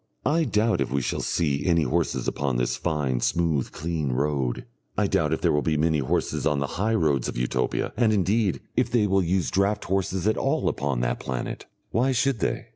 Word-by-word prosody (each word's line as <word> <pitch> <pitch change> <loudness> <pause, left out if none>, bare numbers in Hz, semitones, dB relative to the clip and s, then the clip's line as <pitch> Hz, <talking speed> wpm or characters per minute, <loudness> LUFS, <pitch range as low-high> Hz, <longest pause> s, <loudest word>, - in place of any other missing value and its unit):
I 160 +4 +2
doubt 110 -4 +1
if - - -1
we 70 -1 0
shall - - -1
see 70 -4 0
any 85 -2 +3
horses 65 - -1
upon 70 -3 -1
this - - 0
fine, 70 -4 -1
smooth, 80 -5 0
clean 80 -4 -2
road; 70 -2 -1 0.3
I - - +3
doubt - - +1
if - - -1
there - - +3
will 75 - +2
be 80 0 0
many 80 0 +2
horses 65 - -1
on 75 -2 +1
the 70 - 0 0.2
high 110 +2 +2
roads 75 - +1
of - - -5
Utopia, 60 +1 -1
and, 115 -1 +3
indeed, 100 0 +1
if - - +2
they 115 -3 +2
will 95 -1 +2
use 90 0 0
draught 100 +2 +1
horses 95 -1 -1
at 110 - +2
all 140 +4 0
upon 70 -3 -1
that - - -1
planet. 65 -2 -5 0.2
Why 130 +3 +2
should 130 -1 +1
they? - - -2
85 Hz, 205 wpm, -25 LUFS, 70-105 Hz, 0.3 s, any